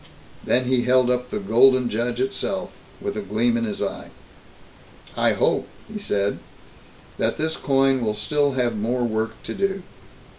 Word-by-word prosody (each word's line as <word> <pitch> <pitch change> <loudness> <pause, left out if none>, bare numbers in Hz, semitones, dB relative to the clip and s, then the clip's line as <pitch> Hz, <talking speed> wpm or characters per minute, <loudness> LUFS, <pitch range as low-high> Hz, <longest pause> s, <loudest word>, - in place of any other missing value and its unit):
Then 125 +1 +2
he 125 0 +2
held 125 0 +3
up 125 0 -1
the - - -3
"Golden 125 +5 +4
Judge" 120 +2 -2
itself, 130 +1 -2 0.3
with - - -4
a 105 - -2
gleam 110 +4 +1
in 115 0 0
his 105 -2 -3
eye. - - -5 1.1
"I - - +3
hope," - - +1 0.3
he 210 - -4
said, 100 - -1 0.8
"that - - +1
this 160 +1 -1
coin 135 -1 +2
will 110 -2 0
have 105 - -8
still 145 -1 +1 0.2
more 115 +3 -1
work 110 -1 -1
to - - -5
do. 195 -1 -1
125 Hz, 160 wpm, -23 LUFS, 110-135 Hz, 1.1 s, Golden